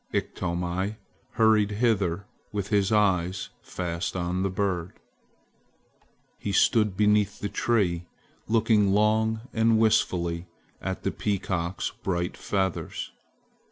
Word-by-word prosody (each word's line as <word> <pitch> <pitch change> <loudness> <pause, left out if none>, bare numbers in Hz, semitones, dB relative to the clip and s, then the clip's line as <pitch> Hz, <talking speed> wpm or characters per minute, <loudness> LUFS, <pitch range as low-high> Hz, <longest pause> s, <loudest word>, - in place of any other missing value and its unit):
Iktomi 90 +4 -2 0.4
hurried 110 -2 +4
hither 100 -5 +1 0.3
with 100 -1 -3
his 100 -1 +2
eyes 95 -4 +2
fast 85 +1 -4
on 90 0 -1
the 95 - +1
bird. 90 -2 -1 1.5
He 100 - -3
stood 105 -1 +3
beneath 105 -1 +3
the 100 - -3
tree 90 -8 0 0.4
looking 110 -3 +3
long 110 +1 +2
and 115 0 +3
wistfully 90 -6 +1 0.3
at - - -4
the - - 0
peacock's 95 -3 -2
bright 90 -2 -1
feathers. 95 -3 -2
100 Hz, 105 wpm, -27 LUFS, 90-105 Hz, 1.5 s, hurried